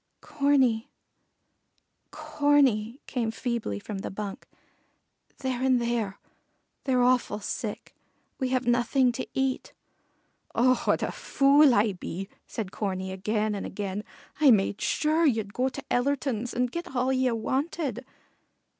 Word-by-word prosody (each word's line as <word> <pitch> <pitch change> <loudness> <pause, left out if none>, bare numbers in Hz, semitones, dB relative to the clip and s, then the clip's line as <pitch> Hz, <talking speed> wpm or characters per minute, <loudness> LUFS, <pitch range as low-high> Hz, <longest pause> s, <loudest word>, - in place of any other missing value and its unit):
"Corney 280 -6 +2 1.2
Corney," 275 -5 +2
came 240 -4 -2
feebly 230 - -3
from 195 - -6
the - - -4
bunk. 200 0 -6 0.9
"They're 255 -2 -3
in 260 -1 +4
there. 235 -5 -1 0.7
They're 255 -2 +3
awful 250 -4 +2
sick. 200 - -5 0.5
We 260 -2 0
have 255 -1 0
nothing 245 +2 +3
to 240 - -5
eat." 265 -1 -1 0.8
"Oh, 255 +1 +3
what - - +2
a - - -1
fool 280 -1 +4
I 210 +1 +3
be!" 190 +2 -6 0.2
said 210 -5 -5
Corney 190 -2 -3
again 210 +3 -1
and 200 - -4
again. 200 +1 -4 0.4
"I 300 -3 +6
made 205 -3 +3
sure 315 +2 +1
ye'd 220 -6 0
go 255 +1 +1
to 280 +2 -8
Ellerton's 250 -2 0
and 250 0 0
get 340 -4 -6
all 255 +1 +2
ye 260 -1 +2
wanted." 260 +2 -2
245 Hz, 130 wpm, -27 LUFS, 210-265 Hz, 1.2 s, I